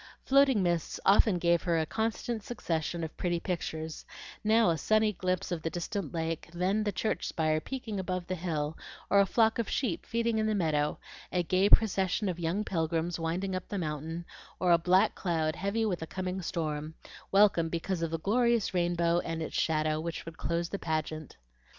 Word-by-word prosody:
Floating 270 -6 +4
mists 170 -2 -1
often 200 0 +5
gave 170 -1 +2
her 170 -2 +1
a 160 - +1
constant 225 +4 -2
succession 170 -6 -3
of 160 - -5
pretty 175 -1 0
pictures; 160 -3 -4 0.4
now 220 -3 +4
a 165 - 0
sunny 215 +5 +3
glimpse 185 -1 -2
of 170 -2 -2
the 165 - -2
distant 175 -1 -4
lake, 165 -1 -3
then 190 +5 +1
the 210 - 0
church 215 +3 -1
spire 155 -1 +1
peeping 225 0 -5
above 185 -1 -3
the 185 - -3
hill, 160 -4 -2 0.4
or 200 - +6
a 200 - +5
flock 225 +1 +3
of 230 - -1
sheep 225 -11 -1
feeding 230 -1 0
in 215 - +1
the 215 - +1
meadow, 155 -5 +1 0.3
a 180 -1 +1
gay 185 +3 +2
procession 200 -1 +3
of 175 -2 -2
young 175 +5 0
pilgrims 165 0 -1
winding 180 +4 -2
up 185 - -5
the 205 - -4
mountain, 160 0 -4 0.3
or 180 -1 +3
a 170 - +7
black 185 +3 +4
cloud 160 -4 -1
heavy 200 +4 -1
with 185 -6 -1
a 160 - -4
coming 185 +1 -3
storm, 155 -2 -3 0.4
welcome 195 -5 +4
because 170 +2 -2
of 165 - 0
the 165 - -2
glorious 235 +4 +2
rainbow 175 -1 +2
and 165 -1 -3
its - - -6
shadow 155 -1 +1
which 165 0 -5
would 165 -1 -8
close 170 +1 -2
the 200 - -4
pageant. 155 -1 -3
175 Hz, 190 wpm, -30 LUFS, 165-200 Hz, 0.4 s, a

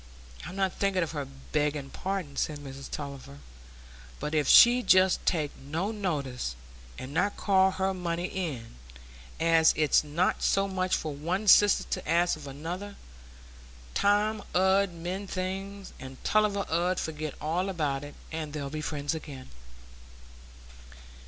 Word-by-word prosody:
"I'm 180 - -8
not 195 -2 0
thinking 195 -2 +1
of 165 - -4
her 145 -3 -4 0.2
begging 150 -2 -1
pardon," 185 -7 -4
said 150 +1 -1
Mrs 140 -1 -9
Tulliver. 140 - -7 0.8
"But 150 - -4
if 150 -3 +1
she'd 245 +1 +7
just 185 0 +5
take 155 -5 0
no 160 +9 -3
notice, 140 - -3 0.4
and 130 +2 -7
not 200 +6 0
call 190 -1 +4
her 190 0 -1
money 175 -1 -2
in; 145 - -5 0.6
as 165 -1 +4
it's 155 -1 +4
not 155 +5 0
so 195 0 +2
much 185 -1 0
for 155 -2 -3
one 175 +9 -2
sister 205 +1 +7
to - - -4
ask 175 +2 +3
of 150 -2 -10
another; 175 +9 -6 1.0
time 210 +1 +2
'ud 190 +1 +3
mend 180 +4 -5
things, 195 +1 -5
and 130 0 -9
Tulliver 210 -2 +2
'ud 175 +2 +1
forget 155 -2 -4
all 175 +5 -1
about 145 -6 -1
it, 145 0 -9 0.2
and 155 -2 -5
they'd 140 -2 -4
be 155 0 -4
friends 145 -1 -2
again." 145 -5 -8
170 Hz, 145 wpm, -28 LUFS, 145-190 Hz, 1.0 s, she'd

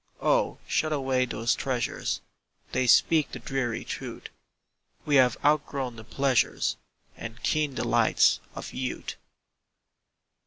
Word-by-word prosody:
Oh, - - +2
shut 155 - 0
away 130 -3 +1
those 115 -1 0
treasures, 130 -3 -2 0.5
They 130 0 +1
speak 155 +4 +4
the - - -4
dreary 120 -1 -3
truth - - -6 0.8
We 145 -2 +4
have 125 -3 +4
outgrown 140 -4 +1
the 110 - -10
pleasures 135 +1 +1 0.4
And 115 +1 -9
keen 150 -3 0
delights - - +3 0.2
of - - -7
youth. 130 -1 -4
130 Hz, 115 wpm, -27 LUFS, 120-145 Hz, 0.8 s, speak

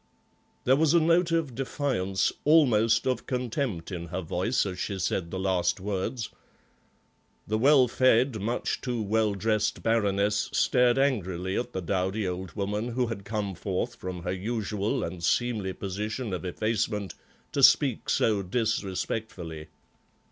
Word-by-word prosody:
There 130 - +4
was 160 +2 +3
a - - +7
note 165 +2 +3
of 165 -6 0
defiance, 120 -7 -1
almost 120 -7 +4
of 130 -3 -1
contempt, 125 - -2
in 85 -2 -5
her 90 +2 -4
voice 90 +10 0
as 95 -2 -5
she 100 0 -3
said 85 -1 -1
the 95 - -4
last 95 -2 +1
words. 100 +4 -3 1.2
The 110 +1 -1
well 135 0 +6
fed, 125 -1 +3
much 115 +4 -2
too 125 -3 -2
well 105 0 +1
dressed 110 0 0
Baroness 105 -2 +1
stared 125 -1 +3
angrily 95 -9 0
at 120 0 -3
the 95 - -3
dowdy 95 +3 -1
old 90 -1 -5
woman 105 +2 -2
who 125 +1 0
had 110 -4 -6
come 105 -2 -2
forth 95 +6 -3
from 90 -4 -7
her 90 - -2
usual 105 +1 -2
and 85 0 -5
seemly 110 0 +1
position 105 +4 -4
of 90 - -4
effacement 105 +1 -1 0.4
to - - -1
speak - - +5
so 105 -3 +2
disrespectfully. 95 -5 -3
105 Hz, 145 wpm, -27 LUFS, 95-120 Hz, 1.2 s, a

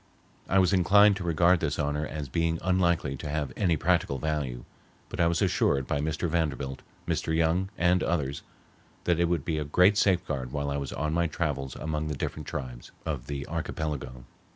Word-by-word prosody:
I 95 - +3
was 95 0 +4
inclined 100 +3 +6
to 95 - -5
regard 85 +1 +3
this 75 -3 -1
honor 75 +1 -1
as 75 -2 -5
being 80 +4 0
unlikely 85 -6 +1
to 75 - -6
have 75 -3 -2
any 85 -6 +2
practical 70 - +1
value, 70 -5 -3 0.4
but - - -7
I 85 - +4
was 85 -1 +1
assured 70 -1 +2
by 70 - -1
Mr. 80 +3 -1
Vanderbilt, 70 -5 -2 0.3
Mr. 80 - 0
Young, 85 +4 +1
and 90 +1 +3
others 70 -4 -1 0.6
that 85 -2 +1
it 85 - +4
would 85 -4 -1
be 80 -2 -1
a - - -1
great 90 +8 +4
safeguard 75 -9 +1
while 70 0 -2
I 70 - -1
was 70 -2 -4
on 75 +1 -2
my 85 0 +2
travels 70 -4 -3
among 75 0 -3
the 75 -2 -3
different 75 +2 -4
tribes 65 -6 -6
of - - -3
the 70 -1 -4
archipelago. 75 -6 -4
80 Hz, 190 wpm, -28 LUFS, 70-85 Hz, 0.6 s, inclined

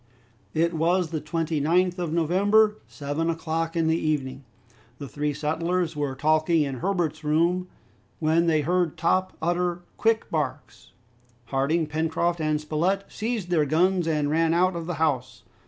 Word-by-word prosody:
It 170 +2 +2
was 170 +1 +1
the 155 -2 -2
29th 165 +3 0
of 175 -3 -2
November, 205 +6 +3
seven 145 +3 -3
o'clock 165 0 -2
in 165 -1 +1
the 160 +1 +2
evening. 135 -3 -2 0.5
The 140 - -7
three 150 +2 -2
settlers 165 +3 -1
were 145 -3 -2
talking 155 +3 +2
in 135 -3 -4
Herbert's 170 -3 -1
room, 170 +4 +1 0.5
when 165 +2 +2
they 155 -2 +3
heard 175 +1 0
Top 185 +2 0
utter 175 +1 0
quick 225 0 +1
barks. - - -4 0.6
Harding, 145 +5 +1
Pencroft, 160 +2 -1
and 155 -1 +1
Spilett 170 +6 0
seized 220 -5 -3
their 155 -4 +2
guns 175 +3 +2
and 150 -2 0
ran 165 +1 +2
out 185 +1 +2
of 170 -1 -5
the 175 - -2
house. 130 -8 -1
165 Hz, 150 wpm, -25 LUFS, 155-175 Hz, 0.6 s, November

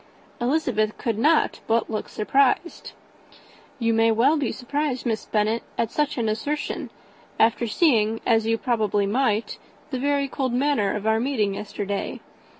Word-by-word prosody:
Elizabeth 240 -5 0
could 225 -3 -2
not 305 +5 +3
but 230 0 +2
look 215 -2 -4
surprised. 275 +9 0 0.8
"You 230 -2 +1
may 225 0 +4
well 245 +8 +3
be 285 -6 -1
surprised, 280 0 -3
Miss 225 -2 -1
Bennet, 215 +2 +1 0.2
at 230 - 0
such 295 -1 -1
an 230 -2 0
assertion, 285 +8 -3 0.5
after 230 +1 +3
seeing, 225 -5 +2
as 225 -2 +2
you 225 0 +2
probably 215 -4 0
might, 220 0 0 0.3
the 260 - -2
very 280 +1 +1
cold 260 -2 -2
manner 255 -6 +1
of 210 0 -4
our 220 0 +3
meeting 225 -6 0
yesterday. 205 0 -4
230 Hz, 150 wpm, -24 LUFS, 215-275 Hz, 0.8 s, may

